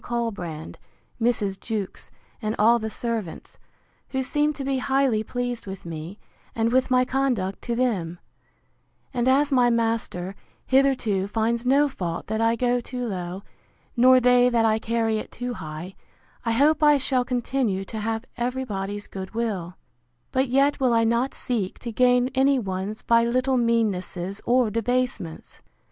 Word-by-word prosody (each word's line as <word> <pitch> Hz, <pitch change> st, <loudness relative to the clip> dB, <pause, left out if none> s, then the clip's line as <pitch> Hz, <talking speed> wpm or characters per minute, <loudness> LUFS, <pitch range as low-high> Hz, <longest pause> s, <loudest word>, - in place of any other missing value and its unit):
Colbrand, 200 Hz, -10 st, -4 dB, 0.4 s
Mrs. 210 Hz, -5 st, 0 dB
Jewkes, 215 Hz, -4 st, -5 dB, 0.3 s
and 215 Hz, -1 st, -2 dB
all 235 Hz, +3 st, +5 dB
the 220 Hz, 0 st, -3 dB
servants, 225 Hz, -7 st, -5 dB, 0.5 s
who 265 Hz, -1 st, -1 dB
seem 295 Hz, +3 st, +1 dB
to 280 Hz, -, -6 dB
be 270 Hz, -1 st, 0 dB
highly 265 Hz, -5 st, +1 dB
pleased 245 Hz, -1 st, -4 dB
with 190 Hz, -2 st, -7 dB
me, 165 Hz, +3 st, -7 dB, 0.4 s
and 230 Hz, 0 st, +1 dB
with 260 Hz, +1 st, +2 dB
my 255 Hz, 0 st, +4 dB
conduct 250 Hz, -8 st, -1 dB
to 235 Hz, -, -2 dB
them: 195 Hz, -9 st, -1 dB, 1.0 s
And 245 Hz, 0 st, 0 dB
as 280 Hz, +3 st, +3 dB
my 250 Hz, -2 st, +4 dB
master, 225 Hz, -6 st, -1 dB, 0.3 s
hitherto, 255 Hz, -8 st, +2 dB
finds 230 Hz, +3 st, -1 dB
no 280 Hz, +3 st, +5 dB
fault 175 Hz, -11 st, -4 dB
that 220 Hz, +1 st, -2 dB
I 230 Hz, 0 st, +3 dB
go 245 Hz, +1 st, +1 dB
too 250 Hz, 0 st, -5 dB
low, 185 Hz, -2 st, -4 dB, 0.5 s
nor 255 Hz, +1 st, +6 dB
they 250 Hz, 0 st, +5 dB
that 230 Hz, -2 st, +2 dB
I 220 Hz, 0 st, +2 dB
carry 225 Hz, -1 st, 0 dB
it -, -, -7 dB
too 245 Hz, 0 st, -4 dB
high, 160 Hz, 0 st, -7 dB, 0.5 s
I 230 Hz, -2 st, 0 dB
hope 295 Hz, +7 st, +3 dB
I 295 Hz, -1 st, +6 dB
shall 260 Hz, -1 st, +1 dB
continue 245 Hz, -5 st, -1 dB
to 220 Hz, +2 st, -6 dB
have 225 Hz, +2 st, -2 dB
every 250 Hz, +2 st, -1 dB
body's 205 Hz, -2 st, -4 dB
good 190 Hz, +2 st, -8 dB
will: 195 Hz, -7 st, -2 dB, 0.6 s
But 265 Hz, +1 st, +1 dB
yet 275 Hz, +4 st, +2 dB
will 255 Hz, -3 st, +3 dB
I 230 Hz, -, +4 dB
not 235 Hz, +4 st, +1 dB
seek 215 Hz, -7 st, -2 dB
to 235 Hz, -, -6 dB
gain 250 Hz, +1 st, +3 dB
any 270 Hz, +1 st, +3 dB
one's 195 Hz, -1 st, -4 dB
by 230 Hz, 0 st, +4 dB
little 255 Hz, +2 st, +1 dB
meannesses 200 Hz, -5 st, 0 dB
or 245 Hz, -2 st, +3 dB
debasements! 230 Hz, -6 st, -2 dB
235 Hz, 155 wpm, -24 LUFS, 205-255 Hz, 1.0 s, nor